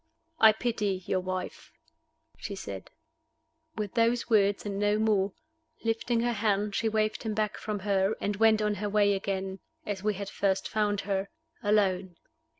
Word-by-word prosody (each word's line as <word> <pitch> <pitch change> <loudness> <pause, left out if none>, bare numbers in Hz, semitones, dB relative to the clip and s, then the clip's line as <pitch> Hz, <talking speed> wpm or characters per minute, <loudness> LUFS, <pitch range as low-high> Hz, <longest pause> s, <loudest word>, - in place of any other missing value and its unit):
"I 220 - +9
pity 210 -4 -1
your 185 - +1
wife," 185 0 -5 0.7
she 200 - -5
said. 100 - -7 0.9
With 210 -3 -4
those 235 +1 +1
words 205 -2 +3
and 200 -1 -3
no 205 0 +2
more, 205 -3 +2 0.5
lifting 230 +1 0
her 240 0 +1
hand 210 -1 0
she 225 +2 +1
waved 215 0 0
him 220 -2 -3
back 215 -1 0
from 210 -2 -4
her, 195 +1 +1
and 205 - -1
went 220 0 +4
on 210 0 +1
her 210 - -1
way 205 0 +3
again, 195 -1 -3 0.3
as 200 -2 -3
we 210 0 0
had 200 +1 -5
first 195 -1 0
found 210 -2 0
her, 195 0 -2 0.3
alone. 195 -4 +1
205 Hz, 160 wpm, -29 LUFS, 195-215 Hz, 0.9 s, I